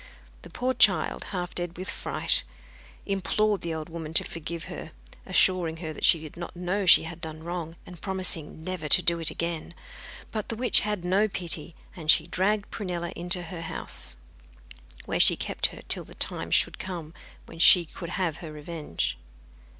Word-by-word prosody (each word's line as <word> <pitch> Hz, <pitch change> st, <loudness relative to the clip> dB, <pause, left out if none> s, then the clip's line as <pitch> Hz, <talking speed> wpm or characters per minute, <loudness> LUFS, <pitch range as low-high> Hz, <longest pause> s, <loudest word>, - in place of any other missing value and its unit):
The -, -, -12 dB
poor 255 Hz, +1 st, -1 dB
child, 190 Hz, -10 st, +3 dB
half 180 Hz, -2 st, -4 dB
dead 175 Hz, -1 st, -3 dB
with 185 Hz, +3 st, -3 dB
fright, -, -, +1 dB, 0.6 s
implored 205 Hz, +1 st, 0 dB
the 165 Hz, -1 st, -3 dB
old 155 Hz, -1 st, -5 dB
woman 165 Hz, -1 st, -7 dB
to -, -, +6 dB
forgive 165 Hz, 0 st, -6 dB
her, -, -, -8 dB, 0.3 s
assuring 175 Hz, -4 st, +3 dB
her 160 Hz, -2 st, -5 dB
that -, -, -1 dB
she 165 Hz, -, +6 dB
did 155 Hz, -1 st, -10 dB
not 170 Hz, +1 st, -7 dB
know 180 Hz, +3 st, -2 dB
she -, -, +8 dB
had 165 Hz, +1 st, -8 dB
done 160 Hz, 0 st, -7 dB
wrong, 170 Hz, -1 st, -5 dB
and 180 Hz, -2 st, -12 dB
promising 185 Hz, -5 st, -2 dB
never 175 Hz, -4 st, -4 dB
to 180 Hz, -, +7 dB
do 170 Hz, -2 st, +2 dB
it 165 Hz, -, +2 dB
again. 170 Hz, 0 st, -4 dB, 0.6 s
But 215 Hz, -2 st, -4 dB
the 230 Hz, -, -2 dB
witch 245 Hz, +2 st, +5 dB
had 210 Hz, -4 st, -3 dB
no 195 Hz, +4 st, +3 dB
pity, 170 Hz, -4 st, -4 dB, 0.2 s
and 160 Hz, -4 st, -8 dB
she 155 Hz, -, +6 dB
dragged 200 Hz, +4 st, 0 dB
Prunella 175 Hz, -5 st, -4 dB
into 175 Hz, +1 st, -2 dB
her 170 Hz, 0 st, -7 dB
house, 65 Hz, -, -2 dB, 0.9 s
where -, -, -1 dB
she -, -, +8 dB
kept -, -, 0 dB
her -, -, -11 dB
till -, -, +3 dB
the -, -, -14 dB
time -, -, -2 dB
should -, -, +3 dB
come 170 Hz, -4 st, -6 dB, 0.3 s
when 165 Hz, -, -12 dB
she 175 Hz, 0 st, +8 dB
could 170 Hz, +2 st, -8 dB
have 175 Hz, -4 st, -1 dB
her 160 Hz, -3 st, -8 dB
revenge. 150 Hz, -, -4 dB
175 Hz, 180 wpm, -27 LUFS, 160-185 Hz, 0.9 s, she